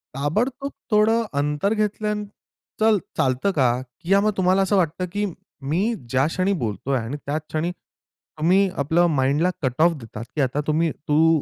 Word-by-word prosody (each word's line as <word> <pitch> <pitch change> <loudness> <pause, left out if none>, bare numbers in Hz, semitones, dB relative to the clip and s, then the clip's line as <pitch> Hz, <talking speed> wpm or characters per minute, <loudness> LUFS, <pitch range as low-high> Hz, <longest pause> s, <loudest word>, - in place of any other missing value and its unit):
ताबडतोब 240 - -1 0.2
थोडं 220 +2 +4 0.2
अंतर 150 +8 0
घेतल्यानंतर 210 -1 -2 0.5
चल 220 -1 +5 0.2
चालतं 130 +10 +1
का 130 -4 +4 0.3
किंवा 195 +4 +3
मग 215 0 +2
तुम्हाला 185 +1 +3
असं 195 +2 +2
वाटतं, 175 +1 0
की 205 +1 -1 0.4
मी 170 +5 +1 0.3
ज्या 130 +2 +2
क्षणी 185 +4 0
बोलतोय 115 +6 -1
आणि 115 +6 -4
त्याच 150 +2 -2
क्षणी 160 +3 -1
तुम्ही 185 +2 -2
आपल्या 160 +5 +2
माइंडला 145 +3 +2
कटऑफ 150 +6 +3
देतात 115 -2 -8
की 150 - +1
आता 135 +3 0
तुम्ही 155 +1 +2 0.2
तू 160 0 +4
165 Hz, 150 wpm, -23 LUFS, 145-200 Hz, 0.5 s, चल